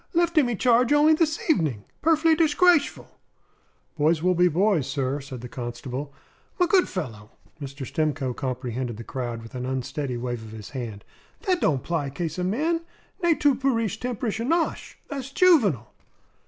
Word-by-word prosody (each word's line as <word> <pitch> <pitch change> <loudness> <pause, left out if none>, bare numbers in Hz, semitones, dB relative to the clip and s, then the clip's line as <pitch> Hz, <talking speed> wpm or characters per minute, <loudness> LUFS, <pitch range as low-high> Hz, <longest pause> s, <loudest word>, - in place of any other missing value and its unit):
"Left 340 0 +2
immy 245 -8 +3
charge 245 +2 +3
only 295 +2 +6
this 310 0 0
evening, 155 - +1 0.2
Perf'ly 320 0 +4
dishgrashful!" 330 0 +3 0.9
"Boys 155 +2 +2
will 180 0 +3
be 180 0 +4
boys, 180 -3 +2
sir," 140 0 -1
said 130 -3 -8
the 125 - -7
constable. 125 +3 -6 0.5
"M' 360 - +5
good 365 +1 +3
fellow 115 - -6 0.2
" - - -28
Mr. 140 0 -6
Stimcoe 145 -3 -1
comprehended 125 -3 -4
the 115 - -7
crowd 120 -2 -5
with 115 - -12
an 125 0 -4
unsteady 130 0 -3
wave 120 -1 -4
of 110 0 -10
his 110 -2 -9
hand 115 -7 -6 0.4
"that 370 -5 0
don't 135 -4 +1
'pply 160 -5 -2
'case 165 0 -3
of 180 - 0
men. 315 - 0 0.4
Ne 340 -2 +3
tu 290 -2 +3
pu'ri 250 -3 +1
tempsherish 240 -3 -3
annosh; 325 +8 -1
tha's 275 -2 -5
Juvenal." 235 - +3
165 Hz, 165 wpm, -25 LUFS, -, 0.9 s, only